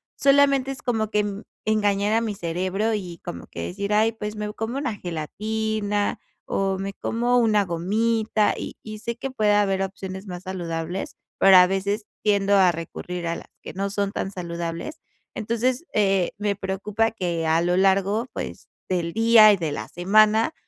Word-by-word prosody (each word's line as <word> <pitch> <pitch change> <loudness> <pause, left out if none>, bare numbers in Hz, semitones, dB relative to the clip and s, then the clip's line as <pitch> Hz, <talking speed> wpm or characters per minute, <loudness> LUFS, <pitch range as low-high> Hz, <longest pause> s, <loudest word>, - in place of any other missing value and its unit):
solamente 275 -1 +4
es 270 - -7
como 220 -4 -1
que 205 0 -1 0.2
engañar 205 -1 +1
a 225 - +4
mi 220 -3 -3
cerebro, 185 +5 -1
y 180 -5 -5
como 85 - -7
que 85 - -6
decir: 200 +2 -3
"Ay, 220 +2 +4
pues, 210 -1 -5
me 210 0 -4
como 225 +4 -4
una 265 -6 -2
gelatina, 205 +5 -2 0.3
o 195 -1 -1
me 195 +1 -3
como 240 +4 0
una 215 -3 +3
gomita", 215 +5 +1
y - - -6
y 215 -1 -8
sé 235 +2 -4
que 270 +1 -5
puede 215 -4 +2
haber 195 -2 +2
opciones 190 0 -6
más 180 0 -7
saludables, 175 -1 -4 0.2
pero 195 -1 +7
a 180 0 +8
veces 200 +3 -1 0.2
tiendo 200 -1 +3
a 185 -2 +5
recurrir 170 +1 -6
a 170 - -1
las - - -12
que - - -8
no 195 +1 -2
son 200 0 -1
tan 195 - -3
saludables. 170 - -5 0.4
Entonces, 245 +7 -1
eh, 195 -4 +2
me 205 -1 -1
preocupa 205 +3 -1
que 170 -6 -2
a 160 +1 +3
lo 175 +1 +1
largo, 195 +4 +2
pues, - - -6 0.2
del 170 -2 -1
día 225 -1 +7
y - - 0
de 165 -4 -2
la - - -5
semana, 215 - +3
205 Hz, 175 wpm, -24 LUFS, 185-220 Hz, 0.4 s, a